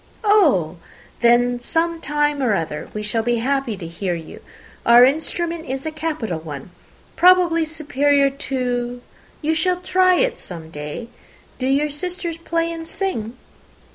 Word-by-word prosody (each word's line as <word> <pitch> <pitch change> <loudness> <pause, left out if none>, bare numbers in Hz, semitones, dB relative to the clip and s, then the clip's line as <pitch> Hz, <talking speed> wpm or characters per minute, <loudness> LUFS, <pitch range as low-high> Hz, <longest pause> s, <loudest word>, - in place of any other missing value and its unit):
"Oh 290 - +3 0.4
then 240 +1 +3
some 330 +6 -1
time 295 0 0
or 235 -6 +2
other 160 -4 -4
we 210 - -5
shall 220 +2 0
be 240 +1 +1
happy 255 -2 -1
to 175 - -7
hear 175 +2 -3
you. 165 -2 -9 0.4
Our 240 +1 +8
instrument 325 +4 -1
is 265 +2 -3
a 315 - -2
capital 305 - -3
one, 150 0 -8 0.4
probably 350 -2 +5
superior 285 -2 +2
to 245 -3 -3 0.4
you 315 +2 +2
shall 360 +3 +1
try 370 0 +3
it - - +1
some 165 -3 -9
day. 150 +10 -6 0.5
Do 255 - -1
your 290 +2 +1
sisters 345 +1 -4
play 335 0 -1
and 325 -1 -7
sing?" 255 - -3
275 Hz, 145 wpm, -21 LUFS, 230-330 Hz, 0.5 s, Our